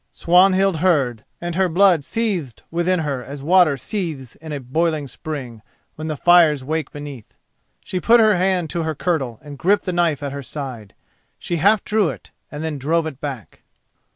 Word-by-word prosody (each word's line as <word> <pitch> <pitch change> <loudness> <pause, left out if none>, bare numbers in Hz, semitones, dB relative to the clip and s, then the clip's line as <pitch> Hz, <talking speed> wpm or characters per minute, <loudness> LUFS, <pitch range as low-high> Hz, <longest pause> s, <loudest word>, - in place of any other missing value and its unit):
Swanhild 185 +1 +3
heard 140 -10 +1
and 175 0 -4
her 185 +1 +1
blood 175 -2 +4
seethed 185 - -3
within 175 +1 +1
her 140 -5 -3
as 140 +1 -8
water 170 -3 +4
seethes 155 - -5
in 160 0 -10
a 145 - -3
boiling 155 +3 -1
spring 130 -5 -7 0.3
when 155 +1 -6
the 155 -2 -3
fires 165 -5 +5
wake 155 +3 -3
beneath. 145 -6 -9 0.5
She 185 - -3
put 235 +6 +5
her 215 -2 +5
hand 180 -2 0
to 170 - -2
her 160 -1 -2
kirtle 135 -9 -2
and 145 -2 -10
gripped 200 +4 +2
the 185 - -2
knife 165 -5 +1
at 140 - -3
her 140 - -5
side. 130 -7 -7 0.4
She 175 - -3
half 200 +5 +3
drew 210 -5 +1
it, - - -9 0.2
then 150 0 -4
drove 160 +4 +1
it 140 -4 -7
back. 135 -7 -7
160 Hz, 180 wpm, -21 LUFS, 140-180 Hz, 0.5 s, fires